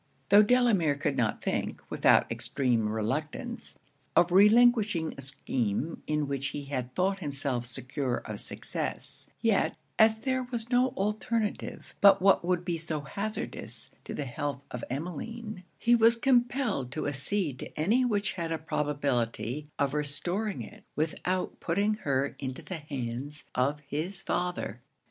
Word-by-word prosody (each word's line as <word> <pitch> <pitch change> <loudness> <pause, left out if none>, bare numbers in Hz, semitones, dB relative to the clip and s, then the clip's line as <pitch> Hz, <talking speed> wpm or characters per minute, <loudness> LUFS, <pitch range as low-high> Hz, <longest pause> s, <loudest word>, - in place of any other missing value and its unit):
Tho' 205 +1 +9
Delamere 210 - +4
could 145 0 -1
not 110 -3 0
think, - - -1
without - - +4
extreme 120 -5 +1
reluctance, 150 - -3 0.4
of 175 0 +5
relinquishing 210 -3 +5
a 135 - -8
scheme 135 0 -2
in 150 -1 0
which 140 -1 -1
he 145 +1 -5
had 130 -3 -4
thought 195 +1 +1
himself 135 -6 -2
secure 125 +1 -2
of 105 -1 -6
success; - - -4
yet, - - +2 0.2
as 220 0 +6
there 260 +2 0
was 245 -1 -3
no 250 +1 +5
alternative 210 +2 -2
but 200 -1 +8
what 195 -1 +5
would 175 0 0
be 170 -2 -1
so 160 -2 -2
hazardous 200 +9 -5
to - - -6
the 145 - -3
health 140 +1 -3
of 125 - -5
Emmeline, 180 - -5
he 240 - +3
was 230 0 +6
compelled 240 - +1
to 155 - -2
accede 145 +1 -1
to - - -8
any 220 +11 +3
which 210 -4 0
had 170 -3 -3
a 165 - 0
probability 145 -4 -1
of 140 -1 +1
restoring 175 +8 -2
it 210 +1 -12
without 180 +4 -1
putting 200 +5 +1
her 140 -8 -1
into 130 -2 -5
the 185 - -5
hands 140 0 -5
of 140 +4 +1
his 155 +6 -4
father. 175 - -2
160 Hz, 145 wpm, -29 LUFS, 140-210 Hz, 0.4 s, Tho